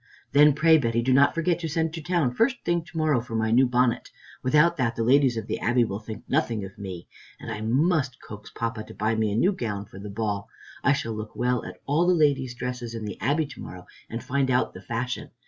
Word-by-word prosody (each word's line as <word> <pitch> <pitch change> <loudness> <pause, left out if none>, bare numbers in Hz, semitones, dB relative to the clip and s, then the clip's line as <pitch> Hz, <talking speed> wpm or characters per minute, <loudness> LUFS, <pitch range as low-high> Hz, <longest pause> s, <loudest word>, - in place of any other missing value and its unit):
"Then 150 +1 +6
pray, 160 +2 +5
Betty, 115 -3 0
do 130 +1 +2
not 140 +4 +5
forget 165 0 +1
to 165 -2 -3
send 160 +1 -1
to 165 - -5
town 160 -6 0
first 240 - +1
thing 170 -1 +1
to 165 - -10
morrow 155 -6 +2
for 115 -1 -7
my 110 0 +1
new 130 +3 +5
bonnet. 125 -1 +1 0.3
Without 150 +6 +4
that 120 -4 0
the 115 - -1
ladies 130 0 +4
of 110 - -3
the - - -3
Abbey 120 +2 +2
will 100 -3 -3
think 110 0 -9
nothing 120 -8 0
of 95 - -11
me. 95 -4 -7 0.3
And 115 - -7
I 110 -1 -5
must 135 +3 +1
coax 105 0 -10
Papa 115 -1 -4
to - - -12
buy 110 +2 0
me 110 -1 0
a - - -1
new 180 - +3
gown 105 - -4
for 95 -1 -12
the 105 +1 -7
ball. 100 -1 -3 0.3
I 140 - +5
shall 115 -5 -3
look 110 0 -7
well 125 0 0
at - - -9
all 155 +5 +2
the 180 - +4
ladies' 140 -5 +2
dresses 125 -1 -5
at 115 - -5
the 105 -2 -6
Abbey 150 +4 +1
to 140 - -11
morrow 90 -1 -9 0.2
and 115 +1 -5
find 140 0 0
out 125 0 +1
the - - -10
fashion. 120 +1 -4
125 Hz, 245 wpm, -26 LUFS, 110-150 Hz, 0.3 s, Then